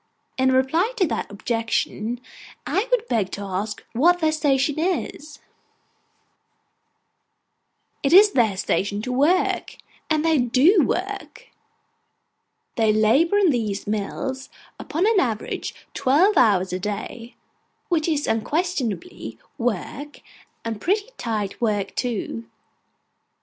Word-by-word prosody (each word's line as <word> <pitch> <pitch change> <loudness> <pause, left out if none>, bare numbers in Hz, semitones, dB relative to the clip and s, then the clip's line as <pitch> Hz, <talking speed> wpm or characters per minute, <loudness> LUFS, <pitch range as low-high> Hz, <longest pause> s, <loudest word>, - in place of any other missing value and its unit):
In 260 0 +2
reply 320 - +2
to 375 - +3
that - - -3
objection, 230 +2 -2 0.4
I 410 +5 0
would - - +1
beg 210 - 0
to 200 - -4
ask 200 +2 -4
what 335 +9 +4
their 315 -2 +2
station 290 -1 +1
is. 315 -4 -2 2.6
It 275 - +1
is 405 +4 +8
their 225 - +2
station 200 +2 -1
to 250 - -3
work. 300 +9 +1 0.3
And 310 0 +1
they 320 -3 +3
do 275 - +4
work. 395 +6 -4 1.3
They 220 -2 +4
labour 230 - +3
in 390 -5 +4
these 215 -6 -2
mills, 215 +6 -3 0.3
upon 330 +5 -1
an 440 -2 +4
average, 225 - -2 0.2
twelve 340 +11 +3
hours 195 - +3
a 185 - -2
day, 220 +4 -5 0.5
which 330 -3 +1
is 300 -3 0
unquestionably 300 - -2 0.2
work, 245 +6 -3 0.4
and 225 -2 -4
pretty 410 +5 0
tight 215 -4 -3
work 205 -4 0
too. 210 - -3
260 Hz, 115 wpm, -23 LUFS, 215-335 Hz, 2.6 s, is